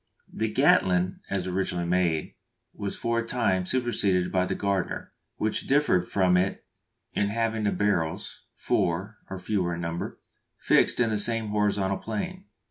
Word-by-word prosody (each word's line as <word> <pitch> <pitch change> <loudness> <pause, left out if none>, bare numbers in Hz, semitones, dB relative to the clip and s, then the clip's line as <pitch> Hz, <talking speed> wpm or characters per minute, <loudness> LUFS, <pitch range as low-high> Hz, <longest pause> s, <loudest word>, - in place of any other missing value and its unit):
_ - - -9
The - - 0
Gatling, 90 0 +3
as 95 -2 -1
originally 90 -1 -1
made, 85 -3 +1 0.4
was 100 -1 -4
for 115 0 0
a 115 - -4
time 95 -7 +1
superseded 100 -8 +1
by 90 -1 +1
the - - -1
Gardner, 100 -2 -2 0.2
which 110 - -1
differed 135 -11 +3
from 90 -2 +3
it 95 +2 -1 0.5
in 100 - +1
having 115 0 -1
the 100 - +2
barrels 85 -6 -1
(four 95 +5 -1
or 95 - -5
fewer 90 -3 -1
in 85 - -5
number) 85 0 -4 0.4
fixed - - +3
in 115 -2 +3
the 105 - +1
same 115 0 +1
horizontal 105 -2 +1
plane. 180 - -4
100 Hz, 155 wpm, -27 LUFS, 90-110 Hz, 0.5 s, Gatling